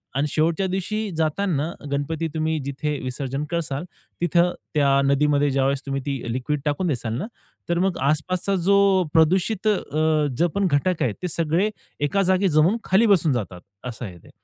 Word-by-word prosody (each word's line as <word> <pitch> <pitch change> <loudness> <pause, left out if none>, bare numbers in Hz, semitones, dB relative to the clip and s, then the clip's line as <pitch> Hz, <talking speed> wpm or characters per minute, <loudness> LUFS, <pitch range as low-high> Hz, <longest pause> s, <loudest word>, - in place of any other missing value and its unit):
आणि 140 +2 +1
शेवटच्या 165 +6 +1
दिवशी 205 +3 -2
जाताना 160 -1 0 0.2
गणपती 150 +3 -1
तुम्ही 160 0 0
जिथे 145 +2 -2
विसर्जन 135 +2 -3
करताल. 160 -4 -2 0.4
तिथं 175 +1 +3 0.2
त्या 145 -2 +3 0.2
नदीमध्ये 145 +1 +3
ज्यावेळेस 135 0 +1
तुम्ही 135 0 -2
ती 135 -5 -3
लिक्विड 140 +4 -2
टाकून 150 +5 0
द्याल 120 -6 -2
ना 165 - -3 0.4
तर 170 0 +1
मग 190 0 +1
आसपासचा 170 +7 0
जो 200 +1 +5 0.4
प्रदूषित 185 +6 +2
अ, 210 -2 +4 0.6
जो 175 - +3
पण 200 -1 +2
घटक 160 +5 +1
आहे 115 - 0
ते 180 - -2
सगळे 170 +4 +1 0.4
एका 195 +7 +1
जागी 190 +1 +2
जमून 160 +7 +3
खाली 195 +5 +3
बसून 170 -8 +4
जातात, 95 -7 -4 0.2
असं 120 0 -6
आहे 90 -4 -9
ते. - - -17
155 Hz, 165 wpm, -23 LUFS, 140-185 Hz, 0.6 s, जो